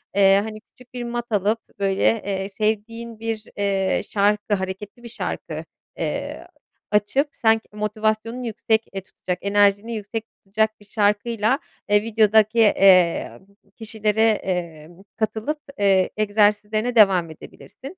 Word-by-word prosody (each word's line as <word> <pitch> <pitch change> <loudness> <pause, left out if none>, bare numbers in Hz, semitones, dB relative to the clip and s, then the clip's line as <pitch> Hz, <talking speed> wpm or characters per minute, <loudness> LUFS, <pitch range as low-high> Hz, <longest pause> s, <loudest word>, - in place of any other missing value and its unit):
Eee, 195 0 +5
hani, 215 -1 -7
küçük 250 +2 -22
bir 245 - -5
mat 240 0 -4
alıp 210 +2 +1 0.2
böyle, 195 -1 0 0.2
eee, 195 0 -3
sevdiğin 220 +2 -3
bir, 225 -1 -4
eee, 195 -1 0
şarkı, 205 +1 0
hareketli 190 +5 -6
bir 235 - -8
şarkı, 230 - -5 0.3
eee, - - -4 0.4
açıp, 210 +8 +2
sen 225 -1 +3
k - - -36
motivasyonunu 215 +3 -2
yüksek, 225 0 0
eee, 195 - -4
tutacak, 180 -1 -5
enerjini 205 +2 +2
yüksek 215 +1 -5
tutacak 215 +2 -1
bir 205 - -19
şarkıyla, 210 +4 +1 0.3
eee, 205 0 +4
videodaki, 220 0 +3
eee, 190 -5 +4 0.4
kişilere, 220 -1 -1 0.2
eee, 170 -4 -4 0.3
katılıp, 225 +7 -2 0.2
eee, 195 -2 +3
egzersizlerine 215 +2 +1
devam 190 -6 +5
edebilirsin. 270 - -12
210 Hz, 125 wpm, -22 LUFS, 200-225 Hz, 0.4 s, Eee